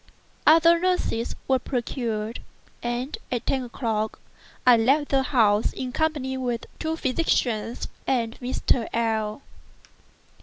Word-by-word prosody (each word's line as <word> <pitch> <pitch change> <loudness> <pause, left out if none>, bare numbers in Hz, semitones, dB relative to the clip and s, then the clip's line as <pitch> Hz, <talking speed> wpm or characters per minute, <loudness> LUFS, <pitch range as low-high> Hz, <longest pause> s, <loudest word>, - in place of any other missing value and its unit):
Other 330 +2 +7
nurses 360 -10 0
were 265 -1 +3
procured; 235 -3 -3 0.4
and 240 +4 -2 0.2
at 245 -2 -2
ten 265 - +1
o'clock 225 -3 -2 0.5
I 250 -1 +8
left 275 +6 +3
the 270 -1 +3
house 225 -6 +3
in 255 -1 -4
company 285 -3 -1
with 245 -3 -2
the - - -12
two 320 0 -1
physicians 250 -6 0 0.2
and 235 -3 0
Mr. 245 -2 0
L—l. 220 +1 -1
250 Hz, 120 wpm, -25 LUFS, 230-275 Hz, 0.5 s, I